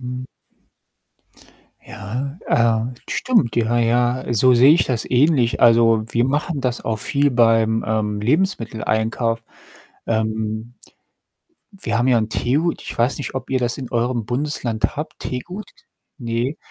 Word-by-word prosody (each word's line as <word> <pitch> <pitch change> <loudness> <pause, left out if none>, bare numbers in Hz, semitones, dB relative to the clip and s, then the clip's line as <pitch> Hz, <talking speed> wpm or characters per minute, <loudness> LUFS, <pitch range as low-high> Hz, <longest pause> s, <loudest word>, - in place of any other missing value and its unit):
Mhm. 125 0 -5 1.6
Ja, 125 - -6
äh, 115 +1 +1 0.2
stimmt, 220 - +1
ja, 120 +1 +1
ja. 120 +2 +1
So 125 +2 +4
sehe 130 +5 +7
ich 170 - +3
das 120 -4 -2
ähnlich. 130 -2 +2
Also, 115 -2 +5
wir 120 +2 +1
machen 145 +2 -1
das 125 -2 -2
auch 110 -1 -1
viel 140 +5 +1
beim, 115 -2 +3
ähm, 105 -1 -1
Lebensmitteleinkauf. 115 - 0 0.6
Ähm, 110 +1 -2 1.0
wir 195 - -3
haben 125 +2 +1
ja 120 - +4
'n 110 -1 -1
Tegut. 145 +9 -1
Ich - - -7
weiß 120 +4 +1
nicht, 140 - -5
ob 130 - -5
ihr 130 - +2
das 120 +1 -2
in 130 -3 -7
eurem 120 -1 -1
Bundesland 125 -2 -2
habt. 150 +1 -6
Tegut? 180 +11 -6 0.5
Ne. 120 +3 -2
120 Hz, 135 wpm, -20 LUFS, 115-135 Hz, 1.6 s, sehe